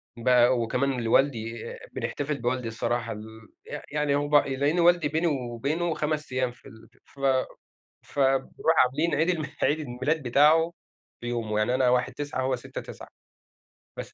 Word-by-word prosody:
بقى 125 +1 +4
وكمان 125 +2 0
لوالدي 115 -2 +1 0.3
بنحتفل 145 0 -3
بوالدي 125 0 -1
الصراحة، 115 +1 -2
ال 110 +1 -10 0.2
ي 145 - -5
يعني 150 -1 +1
هو 145 0 0
ب 150 - +1
لأن 145 +4 +2
والدي 175 -2 +4
بيني 160 +3 0
وبينه 140 +5 -1
5 150 -2 -2
أيّام 130 -1 0
في 125 - -22
ال 110 0 -15 0.2
ف 140 - -20 0.8
فبارُوح 135 +3 +1
عاملين 150 +7 0
عيد 160 +4 +1
الم 160 -4 -1 0.2
عيد 155 +2 +2
الميلاد 145 +3 -2
بتاعُه 150 +6 +4 0.5
في 120 - -7
يومُه 115 -3 -2
يعني 110 +4 +1
أنا 130 -1 +3
1/9 130 +2 -1
وهو 130 -1 +1
6/9 120 - -9 0.9
بس - - -7
135 Hz, 150 wpm, -26 LUFS, 120-150 Hz, 0.9 s, بقى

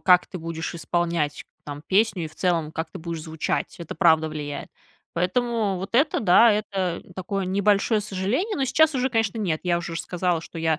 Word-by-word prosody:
как 180 -1 +5
ты 185 - -7
будешь 165 +1 -5
исполнять 170 -2 -1 0.2
там 145 0 -7
песню 195 -3 +2
и - - -5
в 155 - -19
целом, 165 -4 0
как 160 0 -4
ты - - -8
будешь 165 -1 -5
звучать. 160 -1 -2
Это 170 - -7
правда 160 -2 +4
влияет. 145 -2 -5 0.5
Поэтому 210 +3 0
вот 195 +4 -7
это 285 +5 +3
да, 215 +3 +6
это 195 -4 -2
такое 190 +1 -2
небольшое 200 +3 +2
сожаление. 210 - -1
Но 275 - +1
сейчас 315 +4 +3
уже, 260 0 +1
конечно, 225 -2 0
нет. 170 -7 -1
Я 175 -1 +1
уже 175 -1 -5
ж 165 - -2
сказала, 180 -2 -1
что 165 - -9
я 160 -1 +1
180 Hz, 195 wpm, -24 LUFS, 165-210 Hz, 0.5 s, да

